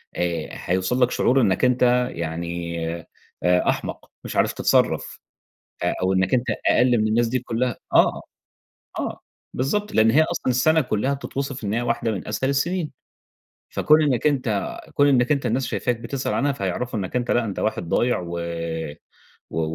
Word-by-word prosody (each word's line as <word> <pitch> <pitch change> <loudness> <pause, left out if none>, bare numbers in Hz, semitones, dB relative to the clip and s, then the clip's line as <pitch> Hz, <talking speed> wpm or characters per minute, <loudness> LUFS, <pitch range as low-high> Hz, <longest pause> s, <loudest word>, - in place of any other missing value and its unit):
آآ 85 -3 -2
هيوصل 95 +8 -1
لك 125 - +4
شعور 135 +2 +3
إنَّك 105 +2 +2
أنتَ 125 0 +3
يعني 85 +1 -4 0.6
آآ، 90 0 +3
أحمق - - -3
مش - - -6
عارف - - +2
تتصرَّف، - - +1 0.6
آآ - - +1
أو 95 +1 +2
إنَّك 95 +6 +2
أنتَ 125 0 +1 0.2
أقل 120 -1 +4
من 110 - +1
الناس 115 +2 +2
دي 130 - 0
كلها. 120 0 -2 0.2
آه، - - +7 0.9
آه، - - 0
آه، - - -4 0.3
بالضبط، 205 +11 -1
لأن 110 +1 +5
هي 150 +7 +5
أصلًا 160 -4 -1
السنة 155 +6 +3
كلها 130 0 0
بتتوصف 135 -2 -5
إن 100 +1 -1
هي 120 - 0
واحدة 115 -1 0
من 95 - -5
أسهل 130 - 0
السنين. 160 +3 -1 0.8
فكون 155 +1 +4
إنَّك 140 -1 +2
أنتَ 125 -8 -1
كون 145 - +4
إنَّك 130 0 +3
أنتَ 140 -3 +1
الناس 125 +3 0
شايفاك 125 -2 -1
بتسأل 135 +2 -3
عنها 140 +1 +1
فهيعرفوا 115 +1 -3
إنَّك 95 +5 -5
أنتَ 125 -1 0
لأ 120 -1 +2
أنتَ 100 - -4
واحد 110 -6 -2
ضايع 120 +7 +2
و 85 -1 -5 1.1
و 80 - -2
120 Hz, 170 wpm, -23 LUFS, 100-135 Hz, 1.1 s, آه